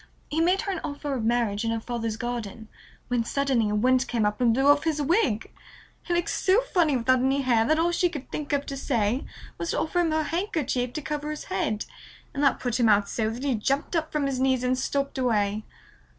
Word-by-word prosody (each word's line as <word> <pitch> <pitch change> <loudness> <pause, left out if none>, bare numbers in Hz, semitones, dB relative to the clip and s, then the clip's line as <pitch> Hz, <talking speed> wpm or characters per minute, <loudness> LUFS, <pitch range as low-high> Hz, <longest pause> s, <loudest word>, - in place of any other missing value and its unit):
He 315 +2 0
made 365 +3 +3
her 400 - -2
an 370 - -3
offer 285 0 -4
of 250 -4 -2
marriage 230 -3 +1
in 225 - 0
her 225 0 -1
father's 230 -1 -3
garden, 230 -2 -5 0.4
when 245 -2 +1
suddenly 260 -3 +1
a 210 - 0
wind 255 +4 +3
came 230 -3 0
up 210 +3 -1
and 240 -2 +4
blew 265 +4 +1
off 290 0 +5
his 320 -2 0
wig. 290 - +1 0.5
He 350 - -2
looked 345 -1 0
so 390 +5 +3
funny 340 - +1
without 255 +2 +3
any 270 +2 +1
hair 235 -4 +3
that 310 +6 +2
all 335 +2 +2
she 350 +1 +2
could 295 -6 -8
think 295 -2 -4
of 285 0 0
to 275 - -5
say 240 -2 0 0.3
was 335 - -3
to - - 0
offer 355 +3 0
him 340 -2 +2
her 315 0 +1
handkerchief 295 - -1
to 305 - -4
cover 300 0 -3
his 305 0 -5
head, 305 - -1 0.5
and 280 - -3
that 280 - +3
put 245 -1 -1
him 235 -2 +4
out 205 -1 +3
so 220 -2 -1
that 235 +4 -6
he 280 -2 +1
jumped 275 +9 -1
up 315 -1 -1
from 300 -2 0
his 270 -2 -1
knees 260 -1 +2
and 250 0 +2
stalked 275 0 -2
away. 215 -4 0
265 Hz, 235 wpm, -26 LUFS, 230-305 Hz, 0.5 s, off